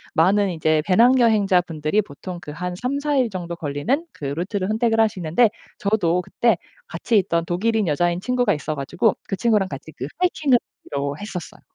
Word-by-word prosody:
많은 195 +4 +3
이제 155 -1 +1
배낭여행자 220 -3 +4
분들이 165 +4 -1
보통 175 +2 -8
그 150 -2 -8
한 180 +4 -4
3-4 280 +7 -1
일 250 -3 +2
정도 175 -3 -5
걸리는 170 - -1
그 145 - -8
루트를 185 +7 -2
선택을 225 +1 +1
하시는데 205 0 +3 0.3
저도 180 -4 +1
그때 235 +5 +1 0.3
같이 230 -3 0
있던 170 -3 0
독일인 210 +3 0
여자인 175 +3 +1
친구가 245 0 +1
있어 155 +1 -4
가지고 175 +10 +1
그 195 - -2
친구랑 210 -3 +2
같이 140 +3 -8
그 130 - -4
하이킹을 305 -8 +3 0.3
하기로 140 +1 -2
했었어요. 195 -5 -7
185 Hz, 375 characters per minute, -22 LUFS, 165-225 Hz, 0.3 s, 배낭여행자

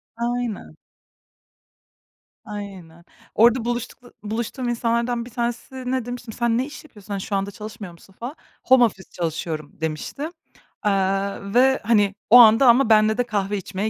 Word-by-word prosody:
Aynen. 235 -1 -3 1.7
Aynen. 190 -6 -9 0.3
Orada 235 +1 +4
buluştukla 240 +1 -5
buluştuğum 235 +4 -3
insanlardan 235 0 -1
bir 245 - -10
tanesine 250 +1 -3
demiştim, 245 -2 -7
sen 235 0 0
ne 255 - 0
iş 295 - -10
yapıyorsun? 210 -8 -10
Hani, 195 - -3
şu 200 - -3
anda 195 +1 -2
çalışmıyor 215 -2 -9
musun 190 +3 -19
falan. 250 +6 -6 0.3
Home 260 -1 +6
office 190 -5 -1
çalışıyorum 160 -3 -4
demişti, 160 - -4 0.5
aaa, 195 0 -1
ve, 265 +2 +4
hani, 205 -3 +2
o 245 - +9
anda 235 +2 +8
ama 240 0 +5
benle 215 0 +4
de 245 - +2
kahve 205 -2 -1
içmeye 195 +2 -3
225 Hz, 145 wpm, -22 LUFS, 200-245 Hz, 1.7 s, o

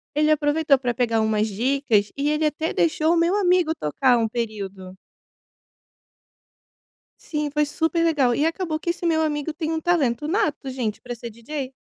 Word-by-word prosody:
Ele 305 +1 +3
aproveitou 295 -1 +2
pra 245 -2 -2
pegar 230 -3 +1
umas 215 0 +1
dicas 225 -1 +1
e 285 +1 0
ele 300 +1 0
até 310 +2 -1
deixou 320 0 +2
o - - +2
meu 335 +3 +2
amigo 360 -4 +3
tocar 245 - +2
um 225 -1 +1
período. 200 -5 -5 2.2
Sim, 300 -2 -3
foi 300 +1 +1
super 325 +2 0
legal! 275 -7 +2
E 295 - +1
acabou 325 -1 -2
que 340 - -1
esse 350 - -10
meu 320 -2 +2
amigo 295 0 -2
tem 315 +1 -4
um 320 0 -2
talento 295 -6 +1
nato, 315 -7 -1
gente, 245 -5 -3
pra 245 -1 -6
ser 235 0 -8
DJ. 260 +4 -6
295 Hz, 170 wpm, -23 LUFS, 235-320 Hz, 2.2 s, Ele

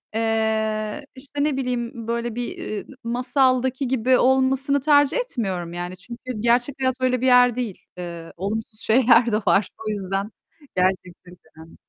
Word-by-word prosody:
eee, 220 +1 0
işte, 280 +2 -4
ne 295 -3 0
bileyim 240 -3 -3
böyle 235 -1 -2
bir, 240 -2 -5
ııı, 205 - -5 0.2
masaldaki 255 +2 +1
gibi 255 0 +3
olmasını 265 +2 +2
tercih 290 - +4
etmiyorum 195 - -3
yani. 175 +1 -5
Çünkü 235 +6 -11 0.2
gerçek 240 +4 +2
hayat 260 -1 +1
öyle 255 -1 +1
bir - - 0
yer 250 -2 +6
değil. 235 -7 -3 0.2
Iıı, 170 -2 -7
olumsuz 215 +3 -4
şeyler 235 +1 +4
de 210 - +2
var. 195 -1 +3 0.2
O - - -1
yüzden 195 0 -3 0.4
gerçekçilik 180 -1 -2 0.2
önemli. 160 +1 -13
235 Hz, 145 wpm, -23 LUFS, 205-260 Hz, 0.4 s, yer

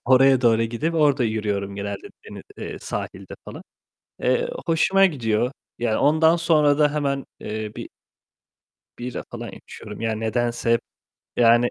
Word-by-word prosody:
Oraya 130 +1 +5
doğru 115 -2 +4
gidip 120 +9 -2
orada 145 -5 +3
yürüyorum 105 -3 -2
genelde 100 - -5 0.2
deni - - -9
eee, - - -6
sahilde - - -6
falan. - - -9 0.6
Eee, 485 0 +1 0.2
hoşuma 190 +4 +4
gidiyor. 120 - 0 0.3
Ya 120 -2 0
ondan 160 +2 +4
sonra 155 -4 +3
da 150 -1 +4
hemen, 140 -2 -1
eee, 110 0 -5
bir - - -6 1.1
bira 125 +1 -5
falan - - -6
içiyorum 105 +1 -10
yani 110 -1 -1
nedense 120 +1 0
hep 115 - +2 0.6
yani 120 +1 +5
120 Hz, 140 wpm, -23 LUFS, 110-150 Hz, 1.1 s, Oraya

